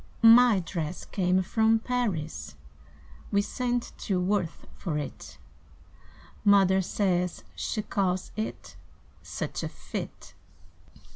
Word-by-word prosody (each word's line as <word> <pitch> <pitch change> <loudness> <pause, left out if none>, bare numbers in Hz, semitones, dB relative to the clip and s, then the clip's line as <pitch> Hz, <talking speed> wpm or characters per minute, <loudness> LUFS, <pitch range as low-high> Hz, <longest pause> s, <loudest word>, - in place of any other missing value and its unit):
My 230 -3 +8
dress 170 -1 -4
came 185 -1 +1
from 220 +4 +3
Paris; 205 - -2 0.8
We 200 0 +3
sent 245 +1 -2
to 190 -4 0
Worth 180 -2 -1
for 160 -6 -3
it; 75 - -6 1.1
Mother 195 -2 +5
says 180 -2 0
she 215 - -2
calls 185 -3 -1
it 215 +1 -5 0.5
Such - - -4
a - - -3
fit!" - - -7
190 Hz, 100 wpm, -28 LUFS, 180-220 Hz, 1.1 s, My